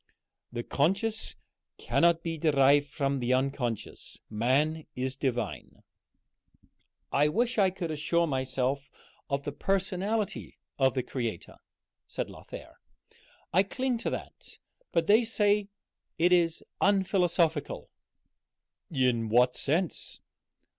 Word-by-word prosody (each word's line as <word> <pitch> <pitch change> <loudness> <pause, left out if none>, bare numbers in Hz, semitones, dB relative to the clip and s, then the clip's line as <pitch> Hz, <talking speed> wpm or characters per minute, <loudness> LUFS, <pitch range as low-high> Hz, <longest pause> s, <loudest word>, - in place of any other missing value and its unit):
The 120 0 -4
conscious 195 - 0 0.4
cannot 170 -1 +2
be 165 -1 -2
derived 145 -2 +4
from 140 -2 -1
the 125 0 +1
unconscious. 130 -4 -3
Man 140 +8 +1
is 130 +1 -2
divine." 120 -7 -3 1.3
"I 145 +2 +4
wish 230 +8 0
I 195 -2 +5
could 180 -3 -4
assure 170 +3 +1
myself 135 -1 -1 0.4
of 140 0 -1
the 145 - -3
personality 195 +6 -1 0.2
of 130 -1 +3
the 130 - 0
Creator," 115 -9 -4 0.5
said - - -4
Lothair. - - -11 0.7
"I 185 - +6
cling 250 +4 -1
to - - -1
that, - - -7 0.3
but 165 - +2
they 215 +6 +5
say 210 -2 +2 0.5
it 175 +2 +4
is 170 -2 +2 0.2
unphilosophical." 180 -6 +1 1.0
"In 125 -6 +1
what 125 +2 +4
sense?" 160 +5 -2
150 Hz, 110 wpm, -29 LUFS, 130-185 Hz, 1.3 s, I